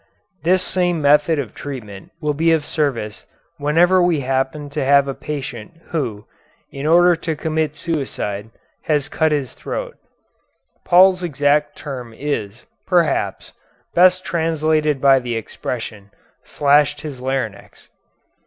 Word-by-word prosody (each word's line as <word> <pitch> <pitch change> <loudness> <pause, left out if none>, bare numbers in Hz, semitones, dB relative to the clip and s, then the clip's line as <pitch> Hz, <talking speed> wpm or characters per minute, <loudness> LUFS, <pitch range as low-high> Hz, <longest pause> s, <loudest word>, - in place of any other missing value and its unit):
This 185 +2 +2
same 175 -3 0
method 150 +2 +4
of 130 -7 -4
treatment 110 -9 -8
will 150 -3 -1
be 165 +3 +2
of 155 -3 0
service 125 -9 -2 0.3
whenever 170 +6 +4
we 175 -4 +2
happen 135 +3 -1
to 150 -1 -2
have 140 +1 +4
a 135 - -2
patient 140 -3 -6
who, 120 -10 -3 0.5
in 140 +2 -4
order 175 +2 +5
to 165 -1 -3
commit 155 -1 -2
suicide, 110 -10 -3 0.4
has 150 -2 +1
cut 160 -1 +1
his 140 -5 -1
throat. - - -6 0.9
Paul's 185 +1 +5
exact 145 -2 +1
term 125 -6 -7
is, 120 -6 -4 0.2
perhaps, 175 -4 0 0.4
best 185 +1 +4
translated 155 -3 0
by 135 -1 +6
the 120 -2 -4
expression, 110 -2 -6 0.3
slashed 145 0 +2
his 140 -5 -7
larynx. 130 -6 -4
145 Hz, 125 wpm, -20 LUFS, 130-160 Hz, 0.9 s, by